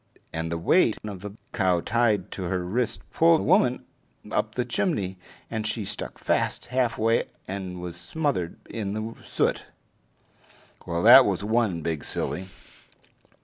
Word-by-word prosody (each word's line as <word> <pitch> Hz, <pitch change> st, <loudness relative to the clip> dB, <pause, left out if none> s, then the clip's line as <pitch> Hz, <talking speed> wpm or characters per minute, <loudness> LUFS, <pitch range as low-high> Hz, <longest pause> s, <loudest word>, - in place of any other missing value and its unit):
And 80 Hz, 0 st, -3 dB
the 85 Hz, -, -1 dB
weight 110 Hz, -, +3 dB
of 100 Hz, -4 st, -6 dB
the 105 Hz, +1 st, -8 dB, 0.2 s
cow 95 Hz, -4 st, +2 dB
tied 115 Hz, +2 st, +1 dB
to 95 Hz, -, -5 dB
her 90 Hz, 0 st, -1 dB
wrist 115 Hz, +6 st, -2 dB
pulled 165 Hz, 0 st, +5 dB
the -, -, -3 dB
woman 125 Hz, 0 st, +3 dB, 0.5 s
up 105 Hz, 0 st, -1 dB
the 125 Hz, -, 0 dB
chimney, 100 Hz, -, -1 dB, 0.3 s
and 110 Hz, -1 st, -3 dB
she 110 Hz, -1 st, -2 dB
stuck -, -, -5 dB
fast -, -, 0 dB
halfway 115 Hz, -3 st, +2 dB, 0.2 s
and 95 Hz, -2 st, -5 dB
was 90 Hz, -1 st, -6 dB
smothered 90 Hz, -, -2 dB
in 100 Hz, -3 st, -4 dB
the 110 Hz, +1 st, -4 dB
soot. -, -, 0 dB, 1.2 s
Well, 85 Hz, 0 st, -1 dB
that 125 Hz, +4 st, +10 dB
was 100 Hz, -1 st, -1 dB
one 105 Hz, -6 st, +1 dB
big 80 Hz, -2 st, -2 dB
silly. 85 Hz, +7 st, -3 dB
105 Hz, 145 wpm, -26 LUFS, 90-120 Hz, 1.2 s, that